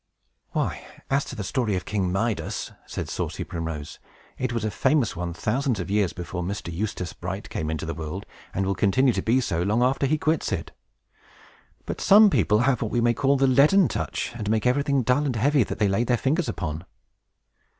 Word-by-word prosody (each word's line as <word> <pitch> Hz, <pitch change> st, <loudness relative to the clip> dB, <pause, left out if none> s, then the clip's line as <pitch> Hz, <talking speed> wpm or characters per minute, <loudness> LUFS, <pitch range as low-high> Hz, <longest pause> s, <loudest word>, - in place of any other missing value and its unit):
"Why, -, -, -1 dB, 0.3 s
as 140 Hz, +1 st, +3 dB
to -, -, -7 dB
the 105 Hz, -, -4 dB
story 110 Hz, 0 st, 0 dB
of 90 Hz, -, -3 dB
King 95 Hz, -4 st, -1 dB
Midas," 105 Hz, +2 st, -2 dB, 0.2 s
said -, -, -4 dB
saucy -, -, -3 dB
Primrose, 80 Hz, -3 st, -5 dB, 0.4 s
"it 130 Hz, -1 st, -2 dB
was 115 Hz, -2 st, -2 dB
a 110 Hz, -, -1 dB
famous 130 Hz, +3 st, +1 dB
one 85 Hz, 0 st, -3 dB
thousands 120 Hz, -, -1 dB
of 90 Hz, +2 st, -4 dB
years 100 Hz, -3 st, +2 dB
before 90 Hz, 0 st, -5 dB
Mr. 90 Hz, -1 st, -4 dB
Eustace 95 Hz, -1 st, -3 dB
Bright 95 Hz, +3 st, -6 dB
came 80 Hz, -1 st, -3 dB
into 80 Hz, 0 st, -3 dB
the 80 Hz, -, -3 dB
world, 80 Hz, +5 st, -6 dB, 0.3 s
and 95 Hz, -, -1 dB
will 100 Hz, -, +1 dB
continue 110 Hz, +8 st, +3 dB
to -, -, -1 dB
be 120 Hz, +4 st, +2 dB
so 85 Hz, -9 st, -1 dB
long 105 Hz, +6 st, +2 dB
after 135 Hz, +2 st, +2 dB
he 155 Hz, +3 st, +2 dB
quits 155 Hz, 0 st, 0 dB
it. -, -, -3 dB, 1.1 s
But -, -, -5 dB
some 205 Hz, +1 st, +7 dB
people 105 Hz, -8 st, +3 dB
have 130 Hz, -1 st, +2 dB
what 110 Hz, -, -1 dB
we 120 Hz, -, 0 dB
may 120 Hz, 0 st, +3 dB
call 140 Hz, +3 st, +2 dB
'The 135 Hz, -, +3 dB
Leaden 145 Hz, +8 st, +5 dB
Touch,' -, -, -3 dB
and 105 Hz, -3 st, -4 dB
make 110 Hz, -1 st, +1 dB
everything 140 Hz, +1 st, +2 dB
dull 125 Hz, +5 st, +2 dB
and 135 Hz, -4 st, -1 dB
heavy 135 Hz, +4 st, +3 dB
that -, -, -5 dB
they 105 Hz, -, +2 dB
lay 100 Hz, +4 st, +1 dB
their 120 Hz, 0 st, +1 dB
fingers 155 Hz, +7 st, 0 dB
upon." 80 Hz, -2 st, -4 dB
110 Hz, 205 wpm, -25 LUFS, 95-135 Hz, 1.1 s, some